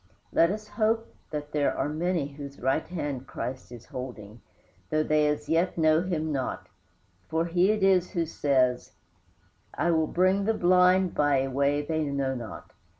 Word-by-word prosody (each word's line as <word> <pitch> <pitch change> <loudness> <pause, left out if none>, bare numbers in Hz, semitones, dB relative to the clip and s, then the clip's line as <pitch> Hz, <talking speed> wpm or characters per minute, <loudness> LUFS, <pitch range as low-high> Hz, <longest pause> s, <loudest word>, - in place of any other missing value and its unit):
Let 165 - +5
us 210 +2 -4
hope 225 +1 0 0.2
that 150 -1 -5
there 145 -1 0
are - - 0
many 160 -1 -1
whose 140 -1 -10
right 135 +5 0
hand 145 -7 -4
Christ 125 +1 -6
is 120 -2 -11
holding, 120 -6 -8 0.5
though 155 +5 +1
they 150 -1 +2
as 150 0 -2
yet 170 +3 +1
know 155 0 +4
him 160 -4 -2
not; 135 -3 -3 0.6
for 160 +1 0
He 175 +3 +2
it 215 -2 +1
is 185 -2 +4
who 170 -3 0
says: 130 -5 0 0.8
"I 170 - +1
will 160 -1 +2
bring 185 +4 +2
the 225 +1 +1
blind 180 0 +4
by 145 -2 +2
a 135 - -3
way 140 +2 +1
they 155 +1 -1
know 140 -2 -1
not. 120 -5 -8
155 Hz, 170 wpm, -27 LUFS, 140-180 Hz, 0.8 s, Let